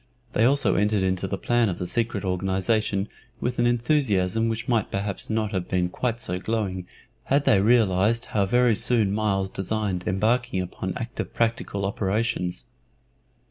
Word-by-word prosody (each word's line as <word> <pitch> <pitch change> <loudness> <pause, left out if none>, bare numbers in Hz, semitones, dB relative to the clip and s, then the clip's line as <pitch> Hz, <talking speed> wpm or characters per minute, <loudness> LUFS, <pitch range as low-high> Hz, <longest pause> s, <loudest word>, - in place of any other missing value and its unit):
They 110 - +2
also 130 -7 +3
entered 105 0 +2
into 95 0 0
the 100 - -3
plan 120 +1 +1
of 90 - -3
the 90 - -4
secret 110 +1 0
organization 95 +2 0 0.3
with 125 0 -2
an 120 - +3
enthusiasm 115 -5 +1
which 115 0 -4
might 115 -5 +1
perhaps 100 -1 -3
not 110 -1 -1
have 95 -4 -2
been 90 -1 0
quite 115 +4 -2
so 90 -5 -2
glowing 95 -4 -2 0.4
had 140 +1 +1
they 95 - +4
realized 110 0 +3
how 100 -2 +2
very 120 +1 +3
soon 110 -3 +2
Myles 100 -3 0
designed 95 -2 -2
embarking 110 +2 +1
upon 90 0 -4
active 120 0 -5
practical 115 -4 -1
operations. 100 -1 -1
105 Hz, 155 wpm, -25 LUFS, 95-115 Hz, 0.4 s, they